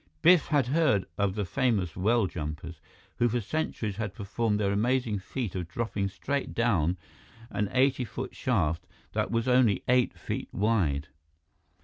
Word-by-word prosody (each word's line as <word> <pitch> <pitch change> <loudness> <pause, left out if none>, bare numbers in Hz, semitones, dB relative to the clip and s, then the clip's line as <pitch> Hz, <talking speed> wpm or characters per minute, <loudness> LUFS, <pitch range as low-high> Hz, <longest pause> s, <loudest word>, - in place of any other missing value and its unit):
Biff 175 -1 +6
had 145 -5 +3
heard 130 - +2
of 100 -1 0
the 105 -2 -1
famous 105 -7 0
well 110 +4 +2
jumpers, 80 -1 -6 0.4
who 120 - +3
for 120 +2 0
centuries 110 -4 -2
had 105 -3 -3
performed 105 +1 -1
their 100 -2 +1
amazing 115 0 +1
feat 110 +1 -4
of 90 -3 -3
dropping 100 +1 -2
straight 140 +8 -3
down 95 -7 +2 0.5
an 105 -1 -1
eighty 130 0 +3
foot 120 +3 -6
shaft 85 -10 0 0.3
that - - 0
was 115 +1 0
only 125 -5 +4
eight 125 0 +3
feet - - -4
wide. 90 -9 +1
110 Hz, 150 wpm, -28 LUFS, 95-125 Hz, 0.5 s, Biff